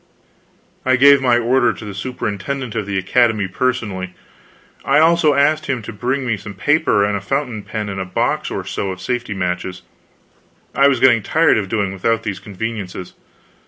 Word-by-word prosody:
I 130 0 +3
gave 140 +2 +6
my 125 -2 +3
order 120 +1 +2
to 110 - -10
the 100 - -6
superintendent 120 +2 -4
of 110 -3 -3
the 100 -1 -2
Academy 110 +1 +2
personally. 95 -5 -2 0.7
I 140 - +2
also 160 -1 +4
asked 155 +2 +2
him 125 -4 -2
to 110 - -7
bring 130 +6 -2
me 115 -4 0
some 100 +1 -9
paper 145 -9 +2
and 105 0 -1
a 100 - -3
fountain 125 0 -2
pen 105 0 -5
and 100 -1 -5
a - - -3
box 95 - -1
or - - -4
so 100 - -3
of 95 -1 -6
safety 120 +1 -3
matches. 90 0 -3 0.9
I 140 +2 +5
was 135 -3 +2
getting 125 -3 +5
tired 160 +4 +3
of 100 -3 -4
doing 100 -3 -1
without 115 +4 0
these 100 -3 -4
conveniences. 100 -3 -6
115 Hz, 180 wpm, -19 LUFS, 100-130 Hz, 0.9 s, gave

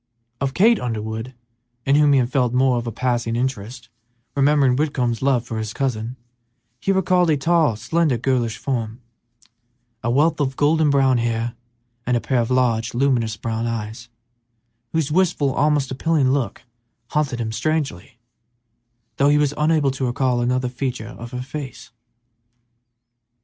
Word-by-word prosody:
Of 135 0 -2
Kate 225 +2 +5
Underwood, 110 +1 -4 0.5
in 135 - +3
whom 145 -1 +5
he - - +5
had 125 -1 +1
felt 125 -3 +1
more 125 -2 +3
than 120 - -5
a - - -5
passing 120 -1 -1
interest, 120 -1 -4 0.5
remembering 140 -2 +3
Whitcomb's 125 -5 -1
love 130 -3 +2
for 115 -2 -4
his 110 0 -4
cousin, 125 -2 -2 0.6
he 195 - 0
recalled 185 -2 +2
a 150 - +3
tall, 160 -4 +2
slender, 140 +5 0
girlish 120 -2 0
form; 115 -4 -3 1.0
a 120 - -2
wealth 150 +6 +2
of 135 -2 -1
golden 155 +1 +3
brown 135 -3 +3
hair, 115 0 -1 0.5
and 125 -1 +2
a - - 0
pair 130 +1 0
of 115 - -2
large, 120 -3 +1
luminous 120 -4 +1
brown 115 +1 -3
eyes, 115 +1 -5 0.8
whose 160 -2 -1
wistful, 160 -5 +2
almost 145 -1 +1
appealing 135 0 +1
look 135 -7 -2 0.5
haunted 145 -5 -1
him 110 -1 -2
strangely, 135 - -2 1.0
though 140 +1 +4
he 145 - +4
was 145 -1 +2
unable 150 -2 +2
to 130 -1 -2
recall 125 0 0
another 125 +1 0
feature 125 -3 -4
of 120 -1 -9
her 125 0 -5
face. 135 -2 -8
130 Hz, 150 wpm, -21 LUFS, 115-145 Hz, 1.0 s, Kate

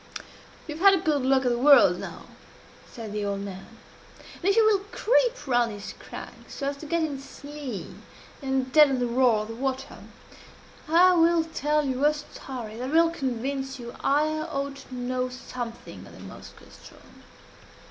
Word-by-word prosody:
"You 300 - -5
have 340 - -6
had 395 -1 +8
a 360 - -3
good 300 -3 +2
look 265 0 +2
at 245 - +3
the 240 - 0
whirl 280 +2 +7
now," - - -8 0.7
said 225 -3 -8
the 210 0 -2
old 200 -1 -2
man, 195 -1 -8 0.7
"and - - -11
if 395 +1 +4
you 450 - +5
will 425 -2 +4
creep - - +1
round 240 -3 +2
this 205 -1 -8
crag, - - -10
so 280 -1 -3
as 280 - -6
to 310 - -9
get 335 +1 0
in 295 -3 -2
its 275 +1 -13
lee, 285 -7 -6 0.6
and 265 -1 -1
deaden 295 -4 +6
the 250 - 0
roar 240 -3 +3
of 215 - -10
the - - -5
water, 265 +2 -4 0.9
I 360 +3 +6
will 335 -1 +4
tell 300 -2 0
you 260 0 -2
a 300 +1 +4
story 250 -6 -8
that 255 +2 -4
will 330 +2 +4
convince 270 -2 -3
you 240 0 -8
I 290 +2 +3
ought 280 -3 -4
to 265 -2 -11
know 250 +1 -2
something 250 -2 -8
of - - -14
the - - -13
Moskoe - - -13
ström." - - -17
270 Hz, 185 wpm, -26 LUFS, 245-305 Hz, 0.9 s, had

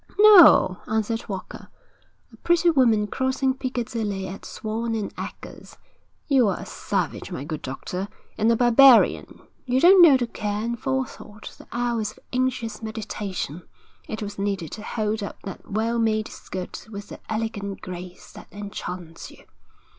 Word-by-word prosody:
'No,' 375 - +8
answered 220 +1 -2
Walker. 190 -2 -7 0.7
'A - - -15
pretty 345 0 +3
woman 235 -8 +3
crossing 260 +4 0
Piccadilly 230 -7 -3
at 190 +2 -9
Swan 225 +1 -3 0.2
& - - -32
Edgar's. - - -9 0.5
You 265 -6 +4
are 195 - 0
a - - -7
savage, - - -3
my 135 - -5
good 155 0 -5
doctor, 180 +8 -5 0.3
and 220 +2 +2
a - - +4
barbarian; 245 +1 +5 0.2
you 255 0 +1
don't 360 +4 +7
know 305 -6 +8
the 245 - -1
care 210 -2 -3
and 235 0 -3
forethought, 260 -5 -4
the - - -16
hours 235 -3 -1
of - - -21
anxious 250 -3 -1
meditation, 205 - -5 0.5
it 220 - -5
has 205 -1 -6
needed 195 -5 -2
to 215 - -7
hold 215 0 -2
up 200 - -6
that 195 - -9
well 225 +3 0
made 220 -1 +1
skirt 185 +2 -8
with 205 -1 -8
the - - -9
elegant 215 -3 -3
grace 180 0 -9
that - - -13
enchants 180 -5 -7
you.' - - -17
220 Hz, 155 wpm, -24 LUFS, 200-245 Hz, 0.7 s, No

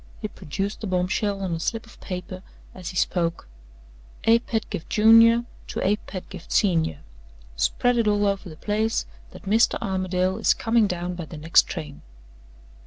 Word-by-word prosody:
He - - -3
produced 195 +8 -5
the 215 - -3
bombshell 190 +2 0
on 180 -3 -2
a 165 - -2
slip 225 +7 -2
of 230 - -18
paper 185 0 -6 0.3
as 180 -3 -7
he 185 - -9
spoke: 170 - 0 0.8
"A. 225 +1 +5
Pedgift, 220 -8 -4
Junior, 230 +2 +6 0.2
to - - -2
A. 205 +2 +3
Pedgift, 185 -3 -9
Senior. 165 - +1 0.5
Spread 245 - +1
it 225 - +2
all 205 0 +2
over 200 -1 -1
the 155 - -11
place 215 +4 0 0.2
that - - -13
Mr. 220 +4 +3
Armadale 185 0 -1
is 225 - +3
coming 225 -2 +2
down 180 -1 -3
by 175 -2 -6
the 155 - -10
next 160 +2 +4
train." 150 -5 -7
195 Hz, 165 wpm, -24 LUFS, 180-220 Hz, 0.8 s, Junior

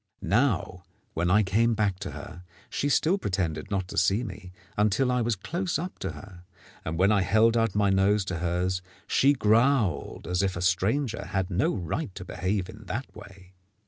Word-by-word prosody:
Now, 100 -3 +1 0.3
when 85 +2 0
I 105 +4 +5
came 115 +4 +2
back 100 -4 0
to - - -5
her, 90 +1 -9 0.3
she 145 - -1
still 175 +7 +2
pretended 90 - -2
not 95 -3 -1
to 100 - 0
see 100 +7 +2
me 95 -4 -8 0.2
until 110 +5 +2
I 125 -1 +1
was 115 -1 +1
close 170 - -2
up 180 +4 -6
to - - -4
her, 95 -3 -12 0.4
and 80 +1 -3
when 95 +4 +4
I 105 -2 +3
held 110 +5 +3
out 115 -4 +1
my 100 -1 +3
nose 95 +1 +3
to 90 -4 -3
hers 90 +1 -1 0.2
she 140 +2 +4
growled 115 - +2
as 90 +2 0
if 95 -2 0
a 85 - -4
stranger 110 +7 0
had 95 -1 -2
no 95 +5 +1
right 95 - -4
to 90 - -7
behave 95 +1 -2
in 105 +2 -12
that 120 +7 -5
way. 95 -2 -13
100 Hz, 190 wpm, -27 LUFS, 90-115 Hz, 0.4 s, I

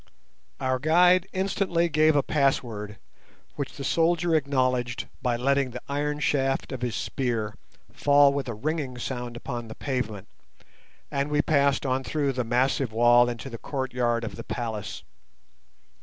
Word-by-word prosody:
Our 130 -1 0
guide 175 +5 +4
instantly 185 -2 0
gave 155 -1 +3
a 145 - +3
password, 115 -8 0 0.6
which 140 -3 -4
the 140 - -5
soldier 165 +3 +2
acknowledged 130 -5 0
by 125 -1 +1
letting 135 +2 +1
the 125 0 -7
iron 145 +1 -1
shaft 135 -3 0
of 130 -3 -5
his 120 -3 -2
spear 115 -5 -2 0.4
fall 145 -1 +5
with 140 -1 -2
a 120 - -4
ringing 140 +1 -3
sound 120 -1 -5
upon 120 -2 -5
the 110 - -9
pavement, 110 -7 -3 0.8
and 140 +1 -1
we 150 0 +2
passed 140 -2 +2
on 130 0 0
through 145 0 0
the 125 -1 -1
massive 125 +1 +1
wall 120 +2 +5
into 120 +2 -6
the 115 -4 -7
courtyard 125 -4 -1
of 115 - -6
the - - -6
palace. 110 -4 -5
135 Hz, 150 wpm, -26 LUFS, 120-145 Hz, 0.8 s, fall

